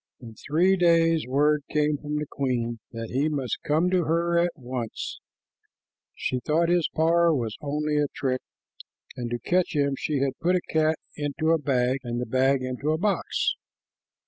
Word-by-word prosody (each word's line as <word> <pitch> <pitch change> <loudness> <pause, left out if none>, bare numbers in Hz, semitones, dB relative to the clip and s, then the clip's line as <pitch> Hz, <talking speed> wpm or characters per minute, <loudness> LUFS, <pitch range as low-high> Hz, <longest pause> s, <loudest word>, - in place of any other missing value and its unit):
In 115 -3 -10
three 170 - +2
days 165 -3 +3
word 145 +3 +2
came 150 -1 +1
from 150 0 -4
the 150 0 -1
queen 120 -5 -2
that 115 0 -6
he 140 +5 +1
must 140 -5 -2
come 160 +5 +2
to 180 -3 +2
her 170 +2 +2
at 175 +1 +3
once. 125 -5 -5 1.0
She 130 - -2
thought 160 +7 +1
his 175 -2 +2
power 170 +1 +4
was 115 -5 -2
only 150 +1 -1
a 145 - +2
trick, 130 -1 -1 0.7
and 120 -1 -4
to 120 - -2
catch 175 +6 0
him 140 -1 +2
she 150 +2 -2
had 135 -1 -1
put 180 +2 +2
a 180 - +1
cat 160 0 +3 0.2
into 150 +2 -1
a 165 - +3
bag 130 -1 +1
and 120 -2 -4
the 125 - -2
bag 130 +2 +2
into 130 +3 -3
a 155 - +2
box. 200 +3 0
150 Hz, 175 wpm, -26 LUFS, 130-165 Hz, 1.0 s, power